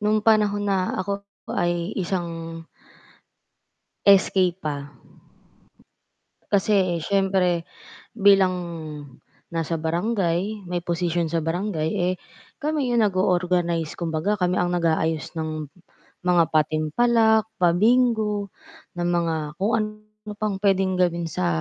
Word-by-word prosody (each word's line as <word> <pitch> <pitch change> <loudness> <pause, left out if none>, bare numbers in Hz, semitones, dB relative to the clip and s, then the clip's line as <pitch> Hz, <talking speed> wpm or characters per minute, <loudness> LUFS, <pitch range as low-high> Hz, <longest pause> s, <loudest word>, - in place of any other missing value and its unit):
nung 210 0 +1
panahon 210 -2 +3
na 190 -2 0
ako 200 +1 -3 0.3
ay 175 +2 -1
isang 165 -3 -4 1.4
SK 190 -2 +4
pa. 145 -4 -5 1.5
Kasi 190 -4 +2
siyempre 185 -3 +1 0.5
bilang 195 -2 +5 1.0
nasa 165 0 -1
barangay, 185 +3 -1
may 175 -1 -2
posisyon 170 -1 -1
sa 165 - 0
barangay 165 0 -2
eh, 180 -2 +1 0.4
kami 295 -4 -1
'yon 240 -1 +3
nag-o-organize 180 -4 0
kumbaga 165 +4 -1
kami 180 -2 0
ang 180 0 0
nag-aayos 160 -2 0
ng 155 -2 -4 0.6
mga 175 -1 +5
patimpalak, 220 +9 +2 0.2
pabingo, 210 +2 +2 0.5
ng 175 - 0
mga 170 -2 +1 0.2
kung 200 +6 -1
ano 215 0 -7
pang 205 -2 -2
pwedeng 190 -2 +1
gawin 170 -2 0
sa 180 +3 -1
180 Hz, 105 wpm, -24 LUFS, 170-205 Hz, 1.5 s, bilang